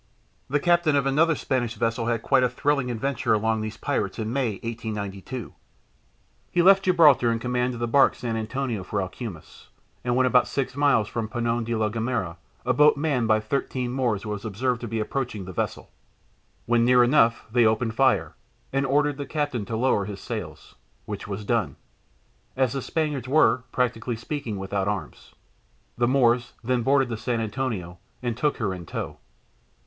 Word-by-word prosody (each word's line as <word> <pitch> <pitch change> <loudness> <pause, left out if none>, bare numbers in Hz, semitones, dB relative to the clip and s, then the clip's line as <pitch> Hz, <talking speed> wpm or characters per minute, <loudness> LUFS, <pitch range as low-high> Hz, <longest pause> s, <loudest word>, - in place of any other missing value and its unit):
The 145 +2 +2
captain 170 -1 +3
of 140 -1 +2
another 155 +4 +3
Spanish 125 -5 -1
vessel 115 0 -1
had 115 -2 -1
quite 135 -2 +3
a 125 - +3
"thrilling" 140 +1 0
adventure 125 -1 0
among 110 +1 0
these 110 0 -5
pirates 145 - -2
in 110 0 -3
May, 130 -5 0
1892. 110 0 -5 1.0
He 175 - +2
left 195 +1 +7
Gibraltar 155 -10 +5
in 115 - 0
command 125 +1 -1
of - - -7
the 120 - -1
barque 135 +3 +4
San 120 -2 -3
Antonio 115 -1 -3
for 100 +2 -3
Alhucemas, 95 -2 -7 0.4
and 120 0 0
when 130 0 +3
about 125 -1 +4
six 135 -1 -2
miles 140 -7 +3
from 110 -1 -3
Peñon 120 0 -1
de 115 0 -1
la 110 -1 +1
Gomera 115 -6 -2 0.3
a - - +2
boat 150 0 +5
manned 140 -6 0
by 110 0 +4
thirteen 125 +2 -2
Moors 120 -6 -1
was 105 -1 -4
observed 120 +3 -1
to 120 - -4
be 115 0 -2
approaching 110 -3 -3
the 95 - -8
vessel. - - -3 0.7
When 120 0 +3
near 125 0 +6
enough 120 -3 +3
they 120 -1 +4
opened 110 +1 0
fire, 135 +3 +2 0.4
and 135 0 +1
ordered 145 +1 +2
the 140 -2 -5
captain 145 -8 -2
to 110 +2 -3
lower 115 -5 +2
his 100 -1 -6
sails, - - -7 0.3
which 100 -1 -6
was 100 +1 -5
done, 115 -2 0 0.8
as 130 -3 +2
the 135 - -2
Spaniards 150 -6 -2
were, 130 -3 +3
practically 120 -1 -1
speaking, 120 -2 -4
without 95 0 -2
arms. 100 -2 -5 0.6
The 120 0 +1
Moors 125 -2 +2
then 125 +1 +1
boarded 135 +1 +3
the 115 - -3
San 115 +1 -2
Antonio 105 -6 -3 0.2
and 120 -2 -1
took 145 +5 0
her 105 -6 -1
in 90 -3 -8
tow. - - -5
120 Hz, 180 wpm, -25 LUFS, 110-135 Hz, 1.0 s, left